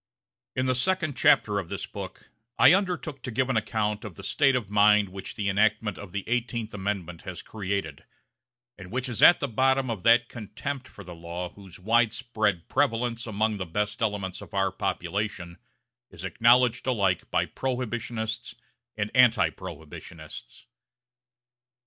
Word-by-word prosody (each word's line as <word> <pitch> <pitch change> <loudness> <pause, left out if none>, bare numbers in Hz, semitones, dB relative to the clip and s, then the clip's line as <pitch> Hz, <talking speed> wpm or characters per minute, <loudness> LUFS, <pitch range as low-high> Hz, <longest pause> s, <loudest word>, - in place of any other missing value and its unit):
IN 130 - 0
the 130 - +2
second 155 +2 +1
chapter 110 -8 +4
of 95 - -6
this - - -4
book, - - -9 0.3
I - - +8
undertook 180 -7 -1
to 130 - -5
give 130 +2 0
an - - -1
account 105 0 -1
of 105 -6 -8
the - - -11
state 135 -3 +3
of 110 -6 -2
mind 105 -1 +5
which 95 +1 -8
the 100 - -2
enactment 105 0 +1
of 100 -3 -9
the 100 0 -3
Eighteenth 115 -1 -2
Amendment 95 -4 -4
has - - -7
created, 100 -8 -4 0.8
and 95 -1 -10
which 130 +5 -2
is 120 -3 -3
at 175 - +8
the 140 - -1
bottom 130 +1 +2
of 110 -5 -4
that 120 +3 +5
contempt 120 +5 -6
for 100 - -12
the 90 -1 -9
law 85 +1 -6
whose 95 -3 -14
widespread 110 -3 +1
prevalence 120 -3 0
among 110 0 0
the 95 - -3
best 105 +6 -2
elements 100 -4 -2
of - - -11
our 95 -1 +2
population 95 -3 -3 0.5
is - - -11
acknowledged 120 +1 +3
alike 100 -8 +1
by - - +1
prohibitionists 120 -2 -3 0.4
and 105 0 -2
anti 125 -2 +5
prohibitionists. 80 -2 -10
110 Hz, 155 wpm, -27 LUFS, 100-125 Hz, 0.8 s, I